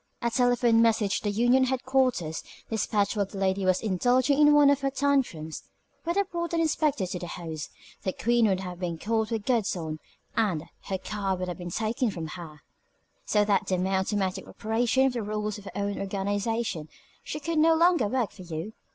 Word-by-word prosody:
A 235 - +1
telephone 245 -2 +3
message 220 -3 +2
to - - -13
the - - +2
union 245 +5 +3
headquarters, 255 -10 0 0.3
despatched 210 -1 0
while 200 -2 0
the 200 - -9
lady 190 0 0
was 185 0 +2
indulging 245 +7 +2
in 295 0 +7
one 295 -1 +6
of 285 -1 +1
her 275 - +1
tantrums, 265 - 0 0.4
would 340 +1 0
have 400 -1 0
brought 340 -1 -3
an 335 - +2
inspector 305 -8 +1
to 180 0 -4
the 175 - -6
house, 160 -3 -6 0.3
the 190 - -1
queen 235 +3 +2
would 190 -2 +1
have 180 -2 -6
been 175 -3 -3
caught 220 +4 0
with 225 -3 -3
the 255 - +3
goods 225 -5 0
on, 155 -2 -5 0.4
and 200 -9 +1 0.2
her 190 - -2
card 195 -1 -2
would 180 0 -3
have 180 - -6
been 175 0 -5
taken 225 +6 0
from 165 -5 -5
her, 155 -3 -9 0.6
so 210 -1 +2
that 205 -1 +1
by 185 - +1
the - - -1
mere 190 +1 +1
automatic 190 -1 -1
operation 235 +4 +1
of 265 - +1
the 240 - -2
rules 210 0 -3
of 205 - -15
her - - -7
own 200 0 -2
organization 200 -3 -2 0.3
she 300 - -5
could 325 +1 -1
no 325 +1 +5
longer 335 - +4
work 240 0 0
for 190 - -13
you. 170 +4 -6
215 Hz, 210 wpm, -27 LUFS, 185-255 Hz, 0.6 s, in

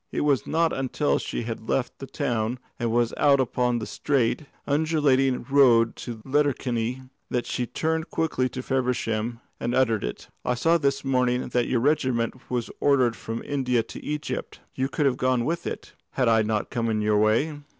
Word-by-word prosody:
It - - -1
was 145 -3 +1
not 165 +1 +2
until 135 +2 0
she - - -4
had 115 -1 -6
left 125 -2 -1
the 135 - -7
town 120 -5 -1 0.2
and 120 -2 0
was 120 0 +1
out 140 -1 +4
upon 125 -1 +1
the 110 - -3
straight, 140 +1 0 0.2
undulating 140 -4 +2
road 125 -5 +5
to 115 -3 -7
Letterkenny 130 -3 0 0.3
that 125 - -1
she 125 - -2
turned 160 +3 -1
quickly 140 -6 0
to 130 +1 -6
Feversham 120 -3 -1 0.2
and 120 +1 -1
uttered 115 -5 +2
it. - - -5 0.2
"I 125 - 0
saw 165 +7 +3
this 140 -1 0
morning 125 -1 +1
that 120 -1 +1
your 120 - +1
regiment 130 -4 0
was 120 -2 -2
ordered 130 -5 +3
from 115 +1 -5
India 125 -4 +1
to - - -10
Egypt. 150 0 -4
You 130 +1 -1
could 150 - 0
have 130 -2 +2
gone 130 -2 +1
with 170 +4 -2
it, - - -6 0.2
had 125 - +1
I 115 -1 +5
not 110 -1 -1
come 115 -1 -1
in 110 -1 0
your 105 0 +2
way. 115 +9 +2
125 Hz, 180 wpm, -25 LUFS, 115-140 Hz, 0.3 s, road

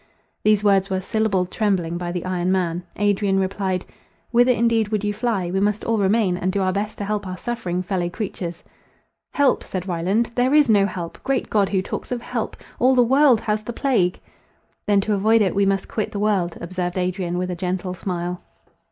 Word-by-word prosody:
These 210 -1 +3
words 195 -2 +3
were 190 -1 0
syllabled 195 -3 0
trembling 180 -5 0
by 175 -1 -3
the 180 0 -4
iron 185 0 0
man. 175 -2 0
Adrian 205 -1 +1
replied, 190 -1 -1 0.5
"Whither 245 +1 +5
indeed 230 -2 +2
would 210 -1 -2
you 205 0 0
fly? 210 -5 -1
We 190 - 0
must 210 +2 0
all 225 -1 0
remain; 195 -2 +2
and 185 +1 -1
do 200 - -1
our 185 0 +1
best 210 +2 -3
to 205 - -4
help 205 -1 -2
our 185 0 -5
suffering 185 -7 -3
fellow 180 -2 -1
creatures." 175 -3 -5 0.7
"Help!" 285 -2 +2
said 185 0 -5
Ryland, 190 +7 0
"there 255 +4 +2
is 300 -2 +6
no 205 -3 +4
help!—great 195 +9 -3
God, 205 -3 +3
who 190 -2 0
talks - - -6
of 245 - -1
help! - - -4 0.2
All 260 +1 +4
the 250 - +6
world 265 -1 +4
has 215 0 -1
the 240 +3 -6
plague!" 225 -10 +1 0.7
"Then 205 -1 +4
to 210 +2 -1
avoid 215 +2 +4
it, 190 - 0
we 200 0 +2
must 195 0 0
quit 215 - -3
the - - -5
world," 200 -5 0
observed 180 +1 -3
Adrian, 180 -1 -1
with 180 0 -2
a - - -3
gentle 180 +1 -3
smile. 180 -1 -4
195 Hz, 200 wpm, -22 LUFS, 180-215 Hz, 0.7 s, is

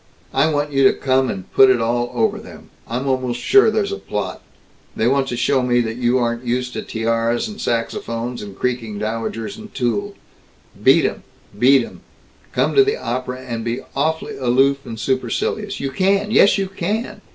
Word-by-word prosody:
I 140 +4 +3
want 145 0 -1
you 135 -1 +2
to - - +4
come 130 -1 +1
and 95 -1 -6
put 135 - +7
it 130 -2 +4
all 120 +1 0
over 220 -1 +1
them. 225 - -13 0.2
I'm 125 +4 -3
almost 130 -2 -1
sure 405 - +5
there's 210 -2 0
a 200 - -4
plot. 100 -3 -4 0.5
They 110 - +1
want 135 +1 +2
to 120 - -3
show 130 +2 +2
me 125 -1 +2
that 115 0 -3
you 125 0 +2
aren't 120 -1 -1
used 125 +1 -2
to - - -3
tiaras 115 - -1
and 210 0 -8
saxophones 115 +1 -2
and 100 -2 -9
creaking 120 -4 -2
dowagers 110 +1 -4
and 215 -1 -11
tulle. 200 +12 -1 0.7
Beat - - +5
'em! - - -2 0.4
Beat 135 +3 +5
'em! - - -13 0.5
Come - - +1
to 410 - +7
the 415 +2 0
opera 125 +1 -4
and 115 -3 -5
be 120 +3 -2
awf'ly 160 +3 -1
aloof 135 +2 +2
and 110 -1 -6
supercilious. 130 - -2
You 135 -1 -3
can! 195 +7 +1
Yes, 210 -2 +5
you 195 - 0
can! 210 +4 -3
130 Hz, 185 wpm, -20 LUFS, 120-155 Hz, 0.7 s, put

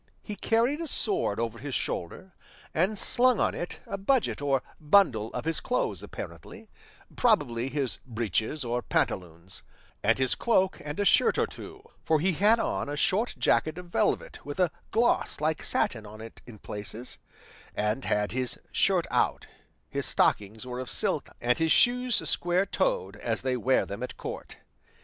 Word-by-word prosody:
He 210 - -6
carried 235 +9 +1
a 330 - -3
sword 380 - 0
over 115 0 -3
his 140 -3 -5
shoulder, 180 - -4 0.4
and 190 +6 +1
slung 245 +2 +4
on - - +2
it 175 - -5
a 195 - -5
budget 240 - +1
or 135 -2 +1 0.2
bundle 150 - +3
of - - -5
his 165 0 0
clothes 250 - -1
apparently, - - -9 0.4
probably 130 - +2
his 135 -3 -2
breeches 115 - -2
or 120 +1 -1
pantaloons, 90 -4 -2 0.4
and 115 +2 +3
his 130 -1 +2
cloak 190 -5 +1
and 150 +3 -5
a 205 - +1
shirt - - +4
or - - +3
two; 405 - -10 0.2
for 160 -1 +2
he 185 +5 +2
had 210 +7 +4
on 185 - -1
a 145 - -3
short 205 +9 +1
jacket 155 +1 +2
of 180 -1 -9
velvet - - 0
with 145 +4 -7
a 180 -3 +3 0.2
gloss 235 +3 +1
like 155 +1 0
satin 110 -3 -1
on 105 +1 -11
it 110 0 -11
in 115 -3 -11
places, 105 +4 -6 0.6
and 105 +5 -1
had 105 0 0
his 125 +1 -2
shirt - - +2
out; - - +1 0.4
his - - -2
stockings 105 +3 +1
were 125 0 -5
of 130 - -5
silk, - - -1
and 125 +4 +1
his 160 -1 +2
shoes 250 -1 +4
square 175 +2 +1
toed - - -1
as - - -2
they 130 -1 0
wear 130 +2 +2
them 100 +3 -7
at 125 - -5
court. - - -7
145 Hz, 170 wpm, -28 LUFS, -, 0.6 s, slung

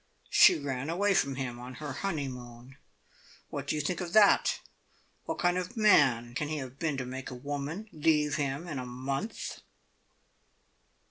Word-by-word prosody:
She - - +7
ran 140 -1 -3
away 200 +4 +2
from 135 -6 +1
him 125 -2 -4
on 125 +1 -8
her 150 -3 -5
honeymoon. 130 -7 -5 0.7
What - - -5
do - - 0
you 150 - 0
think 175 +5 -2
of 175 -1 -5
that? 210 -2 +5 0.7
What - - -3
kind 175 0 +2
of 185 +7 -6
a - - -2
man 135 - +4
can 150 +4 -2
he 155 +1 -2
have 130 -1 -7
been 155 -4 -1
to 130 - -3
make 130 +1 -6
a 125 - -7
woman 145 - -4
leave 150 -1 +2
him 145 +3 -2
in 150 -6 -4
a 125 - -5
month?" 135 - -4
145 Hz, 175 wpm, -30 LUFS, 130-170 Hz, 0.7 s, She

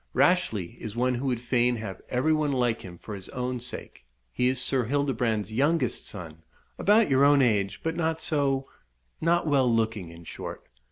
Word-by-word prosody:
"Rashleigh 115 - +1
is 110 -1 -7
one 125 +1 +1
who 125 +3 -2
would 125 -3 0
fain 120 0 +2
have 110 -5 -6
every 130 +6 +2
one 155 -2 +1
like 120 -4 +1
him 90 -2 -10
for 105 - -9
his 95 -2 -3
own 125 0 -3
sake. 125 - -5 0.3
He 125 - +2
is 130 0 +1
Sir 125 -1 +1
Hildebrand's 120 -5 0
youngest 150 +8 +1
son 80 -5 -8 0.4
about 215 +3 +4
your 135 -1 +3
own 140 -1 +6
age, 100 -5 +1
but 165 0 -1
not 160 -1 0
so 140 -4 0 0.5
not 170 +1 +2
well 135 -5 +3
looking, 110 -5 0
in 85 +1 -12
short. - - -8
125 Hz, 180 wpm, -27 LUFS, 110-145 Hz, 0.5 s, own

